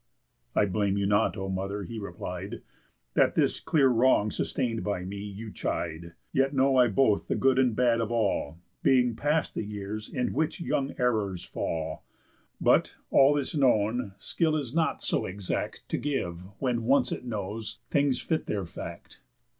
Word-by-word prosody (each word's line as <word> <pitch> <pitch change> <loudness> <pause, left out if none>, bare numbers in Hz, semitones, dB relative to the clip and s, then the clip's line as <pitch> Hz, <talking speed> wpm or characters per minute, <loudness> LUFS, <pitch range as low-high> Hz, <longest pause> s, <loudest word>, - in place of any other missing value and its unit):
"I - - +4
blame 100 0 0
you 100 - +1
not, 100 +2 +2
O 95 0 -3
mother," 95 +2 -3
he 110 +5 -6
replied, 95 +2 -6 0.5
"That, - - +3
this - - +2
clear 145 -4 +3
wrong 120 -3 +3
sustain'd 120 -4 -1
by 100 -3 -2
me, 100 +2 -5
you 105 +2 -7
chide; 85 -2 -3 0.2
Yet 135 +1 +2
know 135 0 +4
I 125 -1 +6
both 110 -1 +2
the - - 0
good 130 0 +3
and 125 -4 +3
bad 120 -1 +3
of 115 0 -2
all, 100 -9 0 0.2
Being 125 -4 +3
past 150 +5 0
the - - -2
years 105 +1 -5
in 125 -2 -1
which 155 -1 0
young 140 -5 -1
errors 105 -7 0
fall. 80 -1 -3 0.6
But, - - +3 0.2
all 140 +2 +6
this 145 +2 -1
known, 120 -5 +2
skill 160 -2 0
is 140 -5 -2
not 160 -1 0
so - - +1
exact 95 0 -4
To - - -1
give, 90 -13 -2 0.2
when 120 -4 0
once 130 0 +3
it - - -4
knows, 110 -2 -5
things 140 -3 +2
fit 160 -2 -2
their 100 -3 -2
fact. 85 - -9
115 Hz, 170 wpm, -28 LUFS, 100-130 Hz, 0.6 s, I